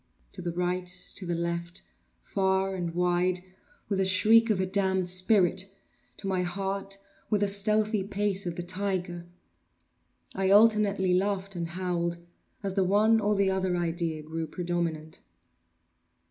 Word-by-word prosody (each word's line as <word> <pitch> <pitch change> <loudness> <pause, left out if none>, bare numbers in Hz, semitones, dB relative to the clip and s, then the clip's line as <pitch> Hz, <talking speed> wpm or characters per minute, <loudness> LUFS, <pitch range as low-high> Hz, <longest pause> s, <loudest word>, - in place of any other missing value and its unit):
To - - -7
the 175 - -3
right—to 180 +1 -3
the 175 - -1
left—far 180 +3 -3
and 175 -3 -4
wide—with 180 +2 -1
the - - +3
shriek 220 +5 +5
of 210 -4 +2
a 190 - +1
damned 190 -1 +1
spirit! 185 0 +2 0.5
to - - -10
my 190 -1 0
heart 195 +2 -2 0.3
with 210 -2 +1
the 205 - +3
stealthy 210 +1 +2
pace 200 -1 -1
of 170 - -3
the 175 - -4
tiger! 180 -1 -3 1.1
I 190 0 0
alternately 205 -3 +4
laughed 195 +1 0
and 170 -1 -3
howled 170 -1 -2 0.5
as 195 -1 -2
the 195 -1 +2
one 210 +4 +4
or 210 0 +1
the 195 -1 +2
other 190 -1 0
idea 165 -2 -2
grew 160 +1 -4
predominant. 165 -2 -3
185 Hz, 135 wpm, -28 LUFS, 175-200 Hz, 1.1 s, shriek